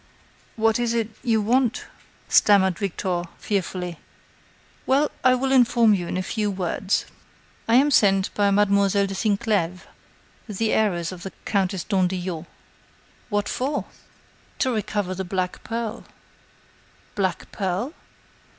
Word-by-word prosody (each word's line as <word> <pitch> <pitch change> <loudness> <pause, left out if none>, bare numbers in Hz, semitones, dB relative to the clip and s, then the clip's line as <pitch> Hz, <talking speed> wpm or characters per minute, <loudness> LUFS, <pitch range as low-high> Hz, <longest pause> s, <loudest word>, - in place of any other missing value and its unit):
"What 225 0 +2
is 235 -1 0
it.... 225 -1 -1
you 225 -4 +2
want?" 245 +2 +1 0.4
stammered 190 -4 +4
Victor, 185 -2 -2 0.2
fearfully. 180 -4 -3 0.9
"Well, 280 +3 +3
I 255 -1 +5
will 265 +1 -1
inform 235 -4 +5
you 180 -4 -1
in - - -3
a 185 - -1
few 210 +2 -1
words. 190 +1 -1 0.6
I 230 - +4
am 280 +4 +5
sent 195 -6 +3
by 205 -1 +2
Mademoiselle 200 0 +3
de 195 - -4
Sinclèves, 200 -4 0 0.7
the 215 +2 0
heiress 175 -6 +1
of 180 -2 -9
the 195 - -5 0.2
Countess 190 -3 0
d'Andillot." 180 -4 -1 0.8
"What 205 -1 0
for?" 280 +3 -2 0.7
"To 260 - +1
recover 205 -3 -2
the 190 +1 -4
black 185 0 -3
pearl." 230 -1 -4 1.1
"Black 190 -4 -2
pearl?" 195 - -2
200 Hz, 125 wpm, -24 LUFS, 185-225 Hz, 1.1 s, I